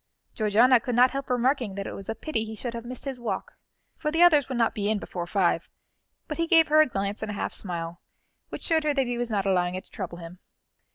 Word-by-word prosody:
Georgiana 230 +4 +4
could 245 0 -3
not 250 +1 +5
help 275 0 -5
remarking 250 -4 +1
that 200 0 -4
it - - -5
was 195 - -9
a 225 - -2
pity 230 -7 -2
he 220 0 -7
should 235 +2 -5
have 235 0 -6
missed 250 +2 -7
his 270 -2 -4
walk, 240 - -4 0.4
for 300 - -2
the 325 +3 +3
others 300 -6 +5
would 260 - -2
not 230 -1 +2
be 205 -1 -1
in 215 - +1
before 175 -3 -5
five; 175 -3 +1 0.6
but 305 0 -5
he 335 - +1
gave 325 -2 +5
her 310 +1 +6
a 310 - +4
glance 200 -3 -3
and 220 - -4
a 210 - -4
half - - -3
smile, 170 -2 -3 0.5
which - - -7
showed 320 -1 +2
her 300 -1 +1
that 270 -2 +2
he 240 -1 -3
was 240 -1 -1
not 205 -3 -1
allowing 180 -2 +1
it 185 - -5
to - - -16
trouble 175 -3 -6
him. 175 +1 -10
230 Hz, 260 wpm, -26 LUFS, 195-270 Hz, 0.6 s, her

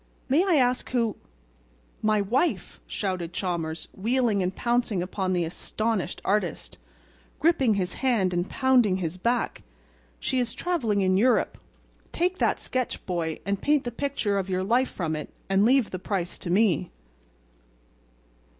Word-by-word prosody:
May 295 +7 +4
I 375 -4 +3
ask 250 -3 +2
who—" 230 -4 0 0.9
"My 215 -1 +2
wife!" 250 - 0
shouted 180 -4 -3
Chalmers, 165 -4 -3
wheeling 230 0 +1
and 185 +1 -1
pouncing 235 -6 0
upon 185 0 -2
the 175 -1 +1
astonished 215 +3 -2
artist, 195 - -1 0.6
gripping 280 -9 +3
his 185 -2 -1
hand 225 -9 +2
and 175 +1 -1
pounding 250 -8 +3
his 180 0 -4
back. 235 +4 0 0.6
"She 260 - 0
is 240 -2 -1
traveling 240 - 0
in 185 0 +3
Europe. 245 +5 +2 0.5
Take 360 +2 0
that - - +2
sketch, 255 -1 -3
boy, 165 -3 -2
and 200 0 -1
paint 295 -1 +3
the 240 - -3
picture 235 -6 -1
of 195 0 -4
your 185 0 0
life 245 +6 +2
from 160 -4 -2
it 150 - -5 0.2
and 195 +1 +3
leave 255 -1 +3
the 185 - -4
price 185 -2 -3
to - - -6
me." 190 -3 +2
210 Hz, 150 wpm, -26 LUFS, 185-250 Hz, 0.9 s, May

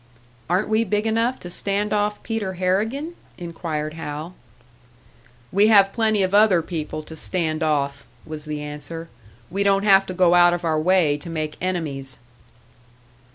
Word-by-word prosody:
"Aren't 180 +4 +1
we 220 +1 +2
big 210 0 -1
enough 230 +3 0
to 175 - -7
stand 200 +3 -1
off 210 0 -1
Peter 220 -4 -3
Harrigan?" 215 - -1 0.2
inquired 165 -3 -4
Hal. 155 +1 -6 1.2
"We 200 +3 +4
have 200 -3 +6
plenty 220 -3 +2
of 185 +1 -1
other 205 -5 +5
people 155 -2 -5
to 160 - -10
stand 160 -1 -2
off," 140 -3 -1 0.2
was 155 -1 -8
the 150 -1 -4
answer. 150 +3 -7 0.4
"We 195 - -1
don't 200 0 +3
have 195 -2 +5
to 185 - -4
go 180 -1 +4
out 175 0 +6
of 175 0 -6
our 155 -1 +1
way 165 -4 +3
to 160 +4 -10
make 155 -2 -3
enemies." 150 -8 -3
180 Hz, 155 wpm, -22 LUFS, 155-205 Hz, 1.2 s, have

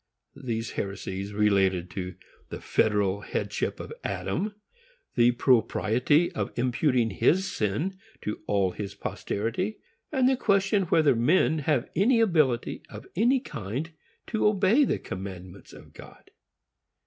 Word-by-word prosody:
These 115 -2 -3
heresies 95 0 -4
related 95 -4 +2
to 90 -2 -5 0.3
the - - -6
federal 100 -2 +1
headship - - -3
of - - -7
Adam, 200 - -2 0.6
the 120 0 +5
propriety 125 +5 +2
of 100 -2 -3
imputing 125 -1 +1
his 190 - +2
sin 150 - -2 0.2
to 105 - -4
all 100 -2 +2
his 100 +2 -6
posterity, 120 - -3 0.3
and 260 -4 +3
the 265 - +4
question 200 -3 +2
whether 155 -5 +3
men 155 +6 +3
have 145 -4 0
any 230 +7 +4
ability 155 - +2
of - - -10
any 240 +8 +3
kind 130 - -5 0.3
to 220 -2 +1
obey 210 +7 +4
the - - 0
commandments 95 0 -8
of - - -14
God. - - -15
120 Hz, 125 wpm, -27 LUFS, -, 0.6 s, the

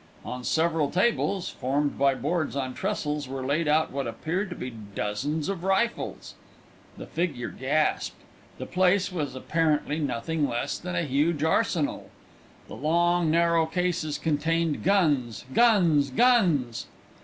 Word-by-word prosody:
On 125 0 -5
several 160 0 +1
tables, 190 0 +1
formed 140 +3 -1
by 140 0 +3
boards 155 +1 -2
on 130 -2 -2
trestles, 150 0 -2
were 130 0 -5
laid 150 +4 0
out 155 +1 +2
what 140 -2 -3
appeared 180 - -3
to 175 - -6
be 125 -4 -6
dozens 110 - -3
of 195 -3 -3
rifles. 195 +5 -1 0.6
The - - -7
figure 150 -9 -2
gasped. 150 +4 0 0.4
The - - -5
place 185 +1 +2
was 145 -7 -3
apparently 155 +1 0
nothing 145 +2 -1
less 120 0 -2
than 180 0 -5
a 170 - +1
huge 150 +2 +1
arsenal. 160 -2 0 0.6
The - - -10
long 170 +3 +2
narrow 170 0 +3
cases 170 -3 -1
contained 160 0 0
guns! 150 - +1
guns!! 175 - +4
guns!!! 165 - +2
155 Hz, 135 wpm, -26 LUFS, 140-175 Hz, 0.6 s, guns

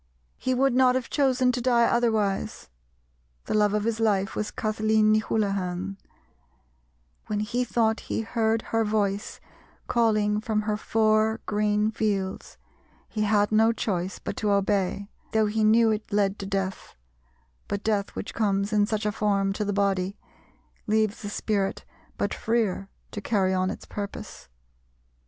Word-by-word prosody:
He 255 0 0
would 270 0 +3
not 255 0 +4
have 260 -2 -2
chosen 260 -3 +3
to 250 0 -3
die 235 -1 +4
otherwise, 220 - 0 0.8
the - - -3
love 210 -1 +3
of 210 - 0
his 225 0 -1
life 205 -2 +1
was 210 - -2
Kathleen 215 0 +1
ni 215 - +4
Houlihan; 195 -3 -2 1.3
when 210 -1 -1
he 240 +4 -1
thought 225 -2 +1
he - - -3
heard 225 0 0
her 225 0 +3
voice 210 -1 -1 0.5
calling 215 -3 +2
from 215 -2 -1
her 210 0 0
four 220 0 +2
green 210 0 +1
fields 200 -4 -2 0.5
he 215 - -3
had 205 -1 +2
no 220 +1 +5
choice 190 -5 -2
but - - -5
to 210 - 0
obey, 200 0 +1 0.3
though 220 -1 +3
he 215 +1 0
knew 225 +1 +5
it 215 0 -3
led 200 -1 +1
to 195 - -5
death; 195 -1 -3 0.7
but 205 0 -3
death 205 -2 -1
which - - -5
comes 200 -1 0
in 205 -1 +3
such 215 -1 -2
a 210 - +1
form 200 -2 +1
to 210 - -2
the 205 - -1
body 195 -1 0 0.7
leaves 215 0 +1
the 205 - -5
spirit 205 -2 -2 0.3
but - - -1
freer 215 -4 -1 0.2
to 210 - -5
carry 195 -4 +1
on 185 0 +1
its 200 - -7
purpose. 205 - -7
210 Hz, 155 wpm, -26 LUFS, 200-220 Hz, 1.3 s, no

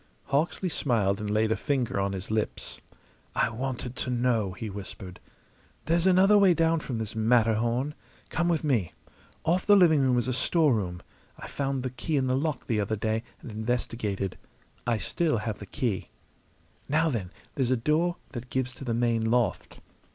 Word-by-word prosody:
Hawksley 160 +6 +1
smiled 110 - +1
and 105 -1 -3
laid 110 +1 +2
a - - +3
finger 125 -2 -1
on 100 0 0
his 95 +2 -5
lips. 110 -1 -2 0.6
"I - - +2
wanted 125 +1 -4
to - - -2
know," 120 -6 +1
he 110 +4 -6
whispered. 95 -2 -8 0.7
"There's 170 +2 +2
another 195 +3 +6
way 190 -3 +5
down 165 0 +3
from 130 -5 -4
this 110 -1 -4
Matterhorn. 115 +4 +2 0.4
Come 170 +1 0
with 165 -2 +1
me. 120 - +1 0.5
Off 175 +3 +1
the 205 - +8
living 170 -6 +6
room 130 -2 +3
is 120 - 0
a 130 - 0
storeroom. 120 - +1 0.3
I - - -8
found 135 -2 -2
the 130 - -2
key 145 +5 -2
in 135 - +2
the 130 0 +1
lock 145 0 -1
the 110 -3 0
other 105 +2 -1
day 110 +1 -1 0.2
and 120 - -8
investigated. 110 -3 -2 0.5
I 120 -2 +2
still 155 +4 0
have 110 0 -3
the 100 - -9
key. 105 -3 -2 0.8
Now, 160 +2 +2
then, 100 -8 -3 0.2
there's 130 -4 0
a 130 - +3
door 155 +8 +1 0.2
that 125 -1 -7
gives 130 0 -1
to 130 - -10
the 120 -3 -1
main 115 -1 +1
loft. 120 0 0
125 Hz, 180 wpm, -28 LUFS, 110-145 Hz, 0.8 s, the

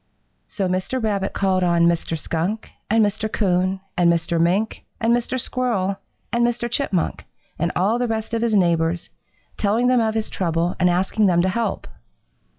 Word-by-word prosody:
So 195 -3 -2
Mr. 185 +7 -1
Rabbit 205 -4 -1
called 190 -1 +1
on 170 -1 +3
Mr. 170 -1 +1
Skunk 170 +8 -3 0.2
and 220 0 +4
Mr. 215 +1 -2
Coon 185 -1 +1
and 175 -1 +4
Mr. 165 0 0
Mink 190 +6 0 0.2
and 230 +1 +3
Mr. 245 +2 -2
Squirrel 225 -7 -1 0.4
and 235 0 +2
Mr. 240 0 0
Chipmunk, 240 - -1 0.4
and 170 +2 0
all 205 +7 +2
the 245 - 0
rest 225 0 -3
of 230 - 0
his 230 -2 +1
neighbors, 170 -3 +1 0.5
telling 220 +4 +1
them 250 -1 +4
of 220 -1 0
his 220 -1 -2
trouble 170 -1 -1
and 180 -1 +4
asking 190 +4 +2
them 175 -1 +3
to 190 - +2
help. 230 +4 -2
195 Hz, 170 wpm, -22 LUFS, 175-225 Hz, 0.5 s, and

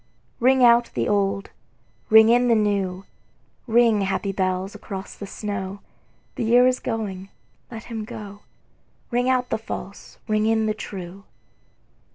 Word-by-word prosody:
Ring 260 +1 +4
out 235 0 +5
the - - 0
old, 195 -1 0 0.6
ring 220 0 +7
in 245 +1 +4
the 235 - +4
new, 200 -3 -1 0.6
Ring, 230 -2 +4
happy 195 0 -1
bells, 185 0 -2
across 195 -2 -8
the 200 - -9
snow: 200 -1 -5 0.5
The 250 - -3
year 240 +2 +5
is 255 0 +2
going, 200 -5 -4 0.4
let 230 -1 -8
him 225 -2 -6
go; 205 -1 -9 0.7
Ring 245 +1 +1
out 255 -1 +1
the - - 0
false, 200 -2 -8
ring 215 0 +1
in 220 0 +2
the 215 - 0
true. 195 -2 -8
215 Hz, 145 wpm, -23 LUFS, 195-235 Hz, 0.7 s, ring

